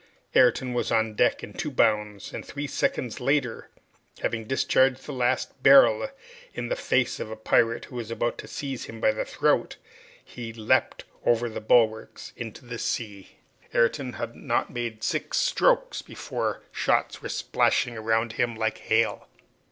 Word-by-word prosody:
Ayrton 125 0 +4
was 120 - -1
on 110 -1 +2
deck - - +2
in 105 - -8
two 150 - -3
bounds, 105 -6 0
and - - -5
three 145 +1 -5
seconds 125 -4 -1
later, 130 -2 0 0.5
having 115 -1 -1
discharged 130 +1 +2
his 135 - -14
last 130 0 -1
barrel 135 - +6 0.5
in - - -4
the - - 0
face 125 - 0
of - - -5
a 110 - -5
pirate 115 +1 +2
who 125 - -9
was 115 -2 -5
about 120 +1 -2
to - - -7
seize 135 -3 -5
him 115 - -9
by 110 - +4
the 110 - -2
throat, - - +1 0.5
he 115 -2 -8
leaped 110 -1 +1 0.2
over 120 0 +2
the 110 - -6
bulwarks 110 +3 +1
into 115 +1 -8
the 120 -1 -6
sea. 100 -4 -4 0.4
Ayrton 125 +2 +2
had 115 +1 -5
not - - -1
made 115 -3 -4
six - - -1
strokes - - +2
before - - -4
shots - - 0
were - - -6
splashing 120 - +1
around 110 +1 0
him 120 -1 0
like 110 0 -1
hail. 110 +1 0
115 Hz, 160 wpm, -26 LUFS, 110-125 Hz, 0.5 s, barrel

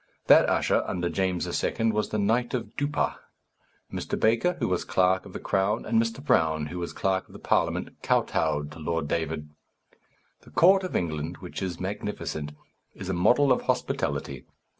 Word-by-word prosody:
That - - +7
usher, - - +2
under 90 -1 -1
James 95 -2 0 0.2
II., 115 0 +1
was 105 0 -1
the 105 - -2
knight 115 +5 +1
of 120 -2 -5
Duppa. 145 0 -1 0.8
Mr. - - -3
Baker, 115 +11 +3
who - - -2
was 90 -1 0
clerk 95 +1 +2
of 95 - -13
the - - -5
crown, 100 +3 0
and 115 0 +3
Mr. 115 +5 -4
Brown, 80 - +2
who 85 +4 -6
was 85 - -4
clerk 95 -1 -1
of - - -18
the - - -9
Parliament, - - -1
kotowed 75 0 0
to 75 - -11
Lord 80 -1 -2
David. 75 -1 -2 0.9
The - - -17
court 190 +3 +5
of 185 - -4
England, 80 0 -2
which 90 +1 -7
is 90 -3 -3
magnificent, 90 -6 -4 0.4
is 95 - -7
a - - 0
model 120 +10 +4
of 125 - +3
hospitality. 70 -2 -1
95 Hz, 175 wpm, -27 LUFS, 80-115 Hz, 0.9 s, That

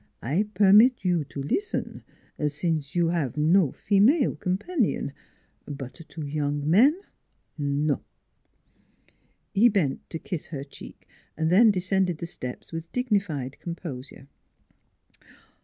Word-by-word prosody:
I 165 - 0
permit 210 +3 +6
you 175 -3 +2
to 140 0 -6
listen, 395 - -2 0.5
since 150 0 -2
you 170 -1 +2
have 160 -6 -1
no 160 0 +4
female 235 +9 +3
com 185 -1 -1
panion; 250 - -1 0.6
but 135 -3 -7 0.2
to 155 -2 -6
young 145 0 -2
men 255 - +5 0.6
no! 145 -1 0 0.8
" - - -39
He 225 +5 +6
bent 180 - -1
to - - -4
kiss 170 -1 -6
her 140 -4 -5
cheek; 140 - -13 0.3
then 180 +9 +5
descended 185 -2 +1
the 170 - -5
steps 125 -6 -7
with 165 0 -6
dignified 195 - -1
composure. 145 -6 -7
170 Hz, 120 wpm, -26 LUFS, 145-200 Hz, 0.8 s, permit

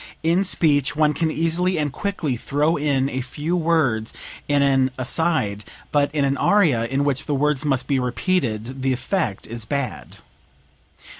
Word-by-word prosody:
In 170 +4 +3
speech 145 -7 +2
one 150 0 +3
can 160 +3 0
easily 165 +3 0
and 150 -3 -1
quickly 175 -9 -2
throw 145 +7 0
in 140 -2 +1
a 130 -1 -3
few 145 +7 -3
words 155 -10 +1 0.3
in 145 -1 +3
an 135 -1 +3
aside; 130 -6 0 0.3
but 145 -1 +2
in 145 -2 +2
an 140 0 0
aria, 155 - +3
in 135 +3 0
which 140 0 -1
the 145 - 0
words 150 0 +1
must 135 -3 +1
be 140 -2 +1
repeated, 125 - -1
the 130 0 +1
effect 125 - -2
is 115 0 -6
bad." 130 0 -4
145 Hz, 160 wpm, -22 LUFS, 130-160 Hz, 0.3 s, In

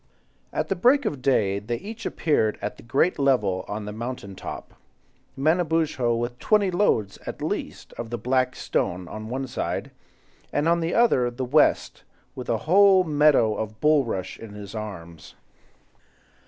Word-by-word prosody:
At - - -2
the - - +1
break 265 +2 +4
of 145 -11 -2
day 100 -7 +2
they 110 +4 -3
each 215 - -6
appeared 130 -9 +1
at - - -5
the - - -13
great 140 +8 +1
level 105 -10 +2
on 105 0 -5
the 105 - -5
mountain 115 -2 -6
top, - - -8 0.6
Manabozho 155 -5 +1
with 120 +1 -3
twenty 205 -3 +2
loads, 145 - +1
at - - -5
least, - - -4
of 115 - -5
the 120 - -3
black 130 +3 0
stone, 90 0 -2
on 110 +3 -7
one 135 +2 -3
side, 125 - -4 0.6
and 150 - 0
on 170 0 +3
the 165 +1 -1
other 225 - +3
the 125 +2 -4
West, 145 +4 +2 0.3
with 125 - -8
a 115 - +2
whole 190 +2 +6
meadow 150 -8 +3
of 110 0 -5
bulrush 135 -12 +1
in 110 -2 -10
his 100 -1 -9
arms. 90 -7 -8
125 Hz, 160 wpm, -25 LUFS, 110-160 Hz, 0.6 s, whole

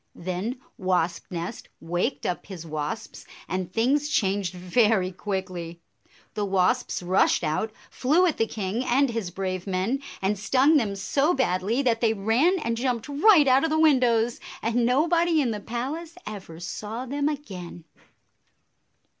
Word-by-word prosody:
Then 185 +8 -4 0.2
Wasp 180 -2 0
nest 170 -1 -6
waked 175 - -2
up 180 - -3
his 180 -4 -8
wasps, 155 +5 -5 0.2
and 185 -1 -3
things 275 +8 +1
changed 195 - +1
very 185 +1 +2
quickly. 180 -3 -5 0.5
The 210 - -2
wasps 195 +3 +1
rushed 185 0 +3
out, 160 +8 -1 0.2
flew 310 +8 +3
at 335 - +1
the 225 - +1
king 215 +3 -3
and 265 +1 +2
his 225 -6 -3
brave 185 0 -4
men, 195 +9 -1 0.2
and 195 +1 0
stung 265 +9 +4
them 210 -7 0
so 275 - +1
badly 225 +1 +1
that 230 -3 +1
they 225 -2 +2
ran 235 - +2
and 230 0 -1
jumped 240 -1 -1
right 300 +1 +5
out 260 +2 +5
of 325 - +1
the 310 - +1
windows, 245 -6 +3 0.2
and 235 +1 +1
nobody 330 +5 +3
in 255 -5 +1
the 210 - -3
palace 285 - -5
ever 190 -6 -8
saw 215 +7 -5
them 285 +3 -1
again. 185 - -7
225 Hz, 150 wpm, -25 LUFS, 185-265 Hz, 0.5 s, right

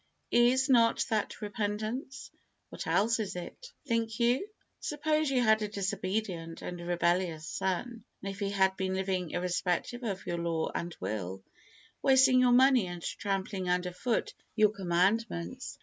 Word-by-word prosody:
Is 245 +2 +4
not 230 -3 +4
that 215 -1 -1
repentance? 215 +6 -4 0.4
What - - -7
else 225 +4 +2
is 210 -4 -3
it, 330 - -8
think 230 -3 -1
you? 245 - +2 0.3
Suppose 305 0 0
you 260 -2 +2
had 220 -1 +4
a 210 - -1
disobedient 190 -4 -3
and 175 -1 -5
rebellious 175 -2 0
son, 225 +8 -3 0.2
and 195 0 -4
he 200 0 -2
had 190 -1 +2
been 190 -1 -2
living 190 -2 -1
irrespective 180 +7 -1
of 200 -6 -4
your 170 0 -2
law 165 -1 -1
and 170 -1 -4
will, 95 -2 -4 0.6
wasting 265 -1 +5
your 250 -1 +5
money 255 -4 +5
and 175 -1 -7
trampling 195 -2 -2
under 180 0 0
foot 230 +6 -1 0.2
your 215 -2 +5
commandments. 195 +4 -1
200 Hz, 145 wpm, -30 LUFS, 180-235 Hz, 0.6 s, wasting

